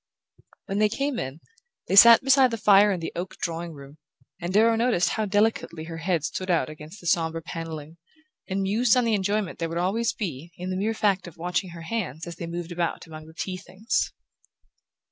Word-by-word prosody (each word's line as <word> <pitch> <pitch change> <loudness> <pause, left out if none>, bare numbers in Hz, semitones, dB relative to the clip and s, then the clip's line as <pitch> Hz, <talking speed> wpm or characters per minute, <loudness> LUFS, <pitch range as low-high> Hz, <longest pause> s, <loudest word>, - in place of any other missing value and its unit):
When 195 +1 -2
they 215 0 +4
came 275 +4 -2
in 130 +5 -6 0.5
they - - 0
sat 230 +4 +9
beside 270 -1 +5
the 230 - -3
fire 205 -1 +5
in 180 -3 -2
the 165 - -4
oak 180 +2 -5
drawing 170 0 -4
room, 140 +1 -13 0.4
and 175 +1 -3
Darrow 225 +3 +4
noticed 225 -7 +2
how 220 - -1
delicately 205 -5 0
her 165 0 -7
head 165 -2 -1
stood 185 +3 -4
out 170 -3 +2
against 155 +6 -11
the - - -14
sombre 165 -1 +1
panelling, 165 -2 -7 0.5
and 195 +1 -1
mused 220 +5 +3
on 250 - +3
the 230 - +1
enjoyment 200 -1 -1
there 165 -1 -2
would 165 - -4
always 220 +7 0
be 170 - -6
in 180 +1 -5
the - - -2
mere 215 +4 -1
fact 195 -4 +1
of 170 - -12
watching 180 +2 -2
her 170 -1 -9
hands 165 - -4
as 170 -1 -8
they 170 - -5
moved 170 0 -5
about 170 -1 -2
among 155 -1 -11
the 160 - -15
tea 185 +2 -4
things... 190 +4 -2
180 Hz, 205 wpm, -25 LUFS, 165-210 Hz, 0.5 s, sat